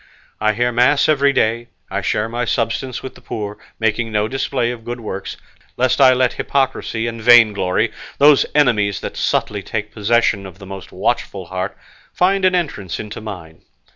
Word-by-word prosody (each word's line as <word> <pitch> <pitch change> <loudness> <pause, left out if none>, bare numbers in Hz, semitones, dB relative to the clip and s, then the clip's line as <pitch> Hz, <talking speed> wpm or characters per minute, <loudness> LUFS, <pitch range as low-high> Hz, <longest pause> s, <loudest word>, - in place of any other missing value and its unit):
I 110 0 +2
hear 120 +3 0
mass 125 +4 +3
every 140 -2 +3
day; 115 -2 0 0.2
I - - -1
share 105 +1 0
my 120 +2 -3
substance 115 +3 -2
with 130 - -7
the - - -17
poor, 105 -1 -6 0.2
making 115 0 0
no 105 0 +1
display 130 -1 -1
of 120 -2 -8
good 120 +1 -5
works, 100 -4 -6 0.4
lest 130 +2 +2
I 130 -1 +8
let 130 -1 +2
hypocrisy 130 -4 -1
and 115 -1 -4
vainglory, 110 -6 +4 0.3
those 145 0 +5
enemies 105 -9 +2
that - - -6
subtly 105 -1 -1
take 105 +1 -5
possession 105 -2 +1
of 95 -1 -13
the 100 - -12
most 95 -1 -9
watchful 95 -2 -2
heart, 95 +2 -4 0.4
find 190 +1 +2
an 185 0 +4
entrance 125 - -3
into 105 0 -7
mine. 90 -7 -9
115 Hz, 170 wpm, -19 LUFS, 105-130 Hz, 0.4 s, I